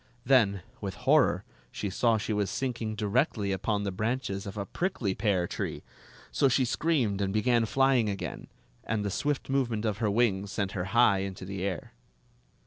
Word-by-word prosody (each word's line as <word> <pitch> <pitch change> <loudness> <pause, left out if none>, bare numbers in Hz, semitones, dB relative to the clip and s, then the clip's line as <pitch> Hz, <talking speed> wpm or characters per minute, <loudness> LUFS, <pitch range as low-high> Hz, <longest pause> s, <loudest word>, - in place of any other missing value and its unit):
Then, 105 -8 +4 0.2
with - - -4
horror, - - +4 0.3
she 100 - -4
saw 115 +4 +2
she 110 +1 -2
was 105 -2 0
sinking 120 -4 -3
directly 105 -1 0
upon 100 +2 -1
the 100 - -2
branches 105 -1 -2
of 100 - -7
a 100 - -2
prickly 125 - -2
pear 95 -4 +1
tree; - - -4 0.5
so 140 - +3
she 130 +1 +3
screamed 120 -8 +1
and 95 -1 0
began 115 +2 +2
flying 135 -3 +3
again, 100 -1 -5 0.4
and 105 -1 -2
the 100 - -1
swift 145 +7 -1
movement 120 -5 0
of 105 -1 -1
her 110 -3 +1
wings 100 -3 +1
sent 100 -1 -2
her 90 -2 -3
high 110 -1 +4
into 95 -1 -5
the 95 0 -5
air. 95 -2 -3
105 Hz, 175 wpm, -29 LUFS, 100-120 Hz, 0.5 s, Then